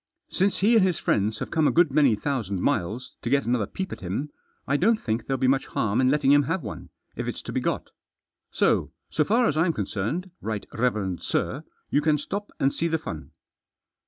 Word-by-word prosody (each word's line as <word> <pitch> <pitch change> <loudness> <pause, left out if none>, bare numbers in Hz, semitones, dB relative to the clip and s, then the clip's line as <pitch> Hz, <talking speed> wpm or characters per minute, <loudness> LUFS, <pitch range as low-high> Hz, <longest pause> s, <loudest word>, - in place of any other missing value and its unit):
Since 195 +1 +1
he 220 +4 +5
and 220 - +6
his 185 -3 +2
friends 105 +2 +1
have - - -5
come 160 -3 +3
a - - +3
good 170 -3 +4
many 140 -5 +4
thousand 105 -6 -2
miles 105 +8 -1
to 115 - -3
get 140 +2 +2
another 120 -4 +1
peep 190 0 -5
at - - -6
him, 105 +11 -3 0.4
I 140 - +2
don't 215 +8 +3
think 110 0 -2
there'll 135 - 0
be 130 0 +1
much 135 +1 +2
harm 110 +3 0
in 130 - +4
letting 140 -1 +3
him 145 0 +7
have 190 - -1
one - - -7 0.3
if - - -4
it's - - -4
to - - -6
be - - -1
got. - - -2 0.6
So, - - +1 0.2
so 155 - +2
far 230 +8 +3
as 150 - +1
I'm 165 +2 +2
con 105 - -2
cerned, 135 - -3
right 110 -2 -3
reverend 105 -7 -1
sir, - - -2 0.3
you 145 - +3
can 150 0 +3
stop 200 +8 -5
and 135 +1 +2
see 170 - 0
the 160 -1 +1
fun." 80 - -7
135 Hz, 220 wpm, -25 LUFS, 110-165 Hz, 0.6 s, him